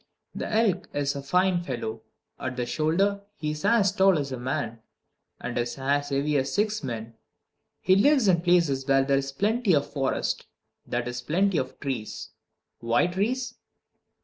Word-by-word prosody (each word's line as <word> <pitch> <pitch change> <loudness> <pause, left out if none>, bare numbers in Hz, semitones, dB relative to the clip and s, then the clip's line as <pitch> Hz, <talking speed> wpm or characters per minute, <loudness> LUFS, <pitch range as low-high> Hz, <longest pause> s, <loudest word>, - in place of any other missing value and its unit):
The - - -4
elk 210 -5 +2
is 140 0 0
a 140 - -4
fine 180 +5 +2
fellow. 120 -7 -4 0.4
At 130 0 -4
the 125 - -1
shoulder 190 +9 +1
he 150 -5 -3
is 150 0 -6
as 210 -5 +4
tall 195 -3 +4
as 140 -2 -3
a 130 - -4
man, 125 -3 -3 0.6
and 120 - -5
is 120 +2 -2
as 140 +2 0
heavy 145 +2 +1
as 135 0 0
six 210 -2 0
men. 115 -3 -5 0.7
He 185 - +4
lives 265 +2 +4
in 175 -3 +4
places 170 -7 +2
where 135 -1 +4
there 135 0 +3
is 135 0 -4
plenty 210 - +2
of 140 -1 -1
forest 135 -2 -1 0.4
that 120 0 -2
is, 125 0 -4
plenty 180 +7 +1
of 130 - -5
trees. 130 -6 -4 0.5
Why 115 +6 +2
trees? 230 +7 -1
145 Hz, 170 wpm, -26 LUFS, 130-190 Hz, 0.7 s, as